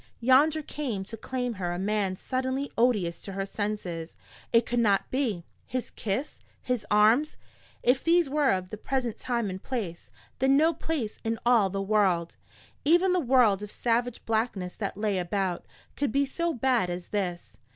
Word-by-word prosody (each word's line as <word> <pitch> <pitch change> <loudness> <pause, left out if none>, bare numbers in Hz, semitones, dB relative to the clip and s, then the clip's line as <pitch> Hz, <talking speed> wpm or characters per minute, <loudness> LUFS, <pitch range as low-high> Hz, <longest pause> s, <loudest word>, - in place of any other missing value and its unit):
Yonder 290 +6 +4
came 245 -11 -4
to 220 - -7
claim 245 +2 -3
her 180 -4 -3
a 175 - -3
man 195 0 0
suddenly 260 +5 -2
odious 210 -8 +1
to 195 - -7
her 195 0 -2
senses. 195 -5 -4 0.3
It 230 0 +4
could 240 - 0
not 205 -4 +2
be. 230 -11 -1 0.2
His 255 0 -4
kiss, 220 +7 -3 0.2
his 250 -3 -2
arms 220 +8 +4 0.5
if 255 +2 +3
these 340 -1 +4
were 290 0 +2
of 185 -1 0
this 215 - -6
present 255 -4 -1
time 235 -3 -1
and 185 +1 -6
place, 205 -10 -5 0.3
then 270 +1 +4
no 320 +3 +4
place 280 -12 -3
in 225 0 -1
all 235 -5 +5
the 195 +1 -2
world, 190 -5 +1 0.5
even 350 +5 +4
the 365 - +3
world 245 - +4
of 210 - -6
savage 240 0 -1
blackness 220 -5 -1
that 200 -2 -4
lay 205 -3 0
about, 180 0 -2 0.3
could 285 -4 -1
be 280 +4 +2
so 335 +5 -1
bad 245 - +1
as 175 0 -5
this. 180 -4 -3
225 Hz, 170 wpm, -28 LUFS, 195-260 Hz, 0.5 s, all